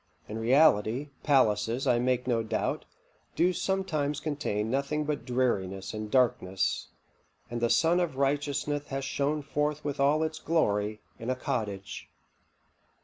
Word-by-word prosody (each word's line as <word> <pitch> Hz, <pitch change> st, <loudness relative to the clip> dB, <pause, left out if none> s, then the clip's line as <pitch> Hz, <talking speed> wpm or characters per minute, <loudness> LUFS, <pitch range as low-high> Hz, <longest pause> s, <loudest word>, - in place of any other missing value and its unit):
In 110 Hz, +2 st, -5 dB
reality, 125 Hz, +1 st, +3 dB
palaces, 115 Hz, -3 st, +2 dB
I 120 Hz, -, +3 dB
make 125 Hz, 0 st, +1 dB
no 120 Hz, -2 st, +1 dB
doubt, 110 Hz, 0 st, -2 dB, 0.5 s
do 180 Hz, +2 st, +3 dB
sometimes 155 Hz, -7 st, -1 dB
contain 115 Hz, -8 st, -2 dB
nothing 140 Hz, +3 st, 0 dB
but 150 Hz, -1 st, -3 dB
dreariness 100 Hz, -7 st, -1 dB
and 110 Hz, 0 st, -5 dB
darkness, 105 Hz, -7 st, +1 dB, 0.6 s
and 120 Hz, -1 st, -3 dB
the 120 Hz, -, +2 dB
sun 170 Hz, +7 st, +4 dB
of 175 Hz, -6 st, -1 dB
righteousness 145 Hz, +1 st, 0 dB
hath 135 Hz, 0 st, -3 dB
shone 145 Hz, +2 st, -1 dB
forth 150 Hz, +1 st, -1 dB
with 145 Hz, -2 st, -3 dB
all 145 Hz, +3 st, +3 dB
its 160 Hz, 0 st, -3 dB
glory 105 Hz, -11 st, 0 dB, 0.2 s
in 115 Hz, -, -5 dB
a 130 Hz, -, +1 dB
cottage." 110 Hz, -8 st, -4 dB
135 Hz, 140 wpm, -29 LUFS, 110-150 Hz, 0.6 s, sun